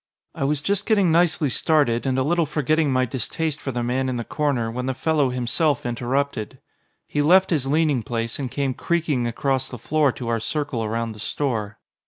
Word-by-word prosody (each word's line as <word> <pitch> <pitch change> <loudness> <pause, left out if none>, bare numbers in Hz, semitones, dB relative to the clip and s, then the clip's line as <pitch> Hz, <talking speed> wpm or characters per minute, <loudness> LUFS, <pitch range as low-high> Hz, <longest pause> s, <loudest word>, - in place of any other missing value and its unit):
I 135 - -2
was 145 0 0
just 200 +3 0
getting 200 -6 +3
nicely 165 -2 +3
started, 135 -3 +2
and 130 -1 +1
a 130 - +2
little 165 +2 +1
forgetting 150 0 +1
my 130 0 +2
distaste 145 +5 -3
for 135 - -3
the 120 -1 -2
man 130 +2 0
in 130 - -2
the 120 - -2
corner, 130 -5 -1
when 125 +2 -4
the 130 - -1
fellow 150 0 +1
himself 125 +4 0
interrupted. 120 -1 -2 0.5
He 145 - -1
left 185 +6 +5
his 145 -5 +1
leaning 150 -3 +2
place, 115 +2 -3
and 135 -3 -3
came 135 0 -1
creaking 150 -5 0
across 130 +2 -1
the 125 - -7
floor 145 +4 +2
to 120 - -7
our 115 -1 0
circle 140 -1 -2
around 115 +1 -2
the 110 - -11
store. 110 -3 -2
135 Hz, 200 wpm, -23 LUFS, 120-155 Hz, 0.5 s, left